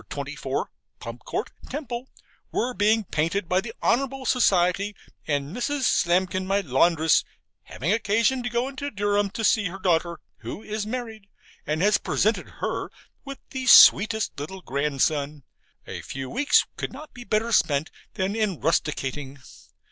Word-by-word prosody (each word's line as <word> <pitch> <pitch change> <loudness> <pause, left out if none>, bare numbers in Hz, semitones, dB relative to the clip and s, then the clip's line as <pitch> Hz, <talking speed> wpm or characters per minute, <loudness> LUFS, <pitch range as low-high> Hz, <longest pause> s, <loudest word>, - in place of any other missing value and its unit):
24, - - -4 0.3
Pump - - -8
Court, - - -3 0.2
Temple, 255 -3 -5 0.4
were 250 +2 -1
being 215 +2 +2
painted 165 +2 -1
by 180 +2 +2
the 225 - -7
Honourable 270 +1 0
Society, 200 -4 +2 0.3
and 145 +3 -2
Mrs. 285 +4 -2
Slamkin, 185 -2 +1
my 200 +1 +2
laundress, 160 +2 +3 0.4
having 150 - -3
occasion 230 +4 +1
to 245 - -3
go 240 +2 0
into 275 +1 -5
Durham 205 -2 0
to 225 - -5
see 215 -1 +3
her 185 +1 -4
daughter, 170 -2 0 0.2
who 215 - -8
is 215 0 -4
married, 225 -4 -6 0.4
and 155 +3 0
has 210 +1 +4
presented 215 +2 0
her - - -2 0.4
with 275 0 -7
the 260 -1 -4
sweetest 220 -6 +7
little 185 +6 -7
grandson 140 +1 -1 0.4
a - - -7
few 135 -1 -6
weeks 285 +3 +3
could - - -4
not 295 +3 -11
be 245 - -10
better 225 0 0
spent 155 -7 +2 0.2
than 190 +2 -1
in 210 -7 -1
rusticating. 145 -3 -1
200 Hz, 150 wpm, -25 LUFS, 165-235 Hz, 0.4 s, sweetest